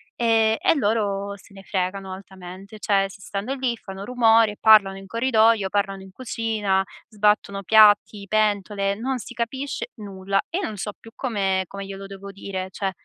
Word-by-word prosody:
ehm, 225 -2 +3
e - - +3
loro 205 -5 0
se 195 0 -18
ne 195 - -12
fregano 190 0 -3
altamente, 190 +1 -11
cioè, 200 -2 +2
si 195 - -13
stanno 205 +8 -4
lì, 255 -3 -1
fanno 195 -2 -8
rumore, 225 -3 +3
parlano 205 -3 +6
in 195 - -12
corridoio, 225 -2 +3
parlano 195 -1 -1
in 190 - -13
cucina, 215 -4 -1 0.2
sbattono 210 -2 +1
piatti, 210 -1 +5
pentole, 205 -2 +1
non 255 +5 -2
si 245 - -9
capisce 260 +4 -3
nulla; 195 -2 -2
io 360 +4 -1
non 215 - -4
so 210 +2 -4
più 225 - -13
come 195 -7 0
come 200 +2 -8
glielo 195 0 -8
devo 195 0 -9
dire 190 -1 -5
cioè, 190 +1 -3
205 Hz, 165 wpm, -23 LUFS, 195-225 Hz, 0.2 s, parlano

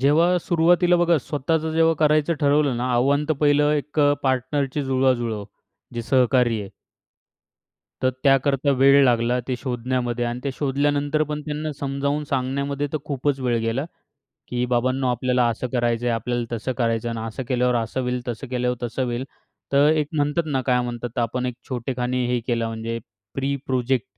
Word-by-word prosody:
जेव्हा 165 +6 +4
सुरुवातीला 175 +1 +3
बघा, 175 -1 +3
स्वतःचं 160 +3 -1
जेव्हा 165 0 +3
करायचं 155 +1 +3
ठरवलं 145 -2 +3
ना 125 +2 -1
आव्हान, 140 +4 +2
तर - - +3
पहिलं 145 0 +4
एक 150 +1 -1
अ, 145 0 +5
पार्टनरची 135 +2 0
जुळवाजुळव, 125 -5 0 0.5
जे 120 - -3
सहकारी 125 -2 +2
आहे. 100 -2 -8 1.3
तर 130 - +4
त्याकरता 135 +1 +3
वेळ 140 +1 +6
लागला 120 -1 +2
ते 130 - -1
शोधण्यामध्ये 120 -1 -2
आणि 120 +1 -3
ते 140 - -1
शोधल्यानंतर 145 +2 0
पण 150 0 -3
त्यांना 150 0 -3
समजावून 140 +2 -1
सांगण्यामध्ये 140 +2 -1
तर - - +1
खूपच 140 0 -1
वेळ 125 -2 +1
गेला, 115 +5 -1 0.6
की 125 0 -1
"बाबांनो, 130 +2 0
आपल्याला 125 0 +1
असं 115 +2 -3
करायचं 120 -1 0
आहे, 120 - +2
आपल्याला 120 +1 -2
तसं 115 +3 -3
करायचं 115 -1 0
आहे 115 - -4
आणि 110 0 -4
असं 115 +4 -5
केल्यावर 125 -1 +1
असं 115 +2 -1
होईल, 125 0 -2
तसं 120 +3 -4
केल्यावर 125 0 -1
तसं 120 +2 -2
होईल." 120 0 -2 0.5
तर 140 +2 +5
एक 155 -2 +1
म्हणतात 145 +3 +1
ना, 140 -4 -1
काय 125 -1 +2
म्हणतात 120 -1 -5
आपण, 120 +2 -1
एक 125 - -2 0.2
छोटेखानी 125 0 -2
हे 125 0 +1
केलं 115 -2 0
म्हणजे 115 +1 -4 0.4
प्री 135 +1 -1
प्रोजेक्ट. 130 -2 0
130 Hz, 170 wpm, -23 LUFS, 120-145 Hz, 1.3 s, वेळ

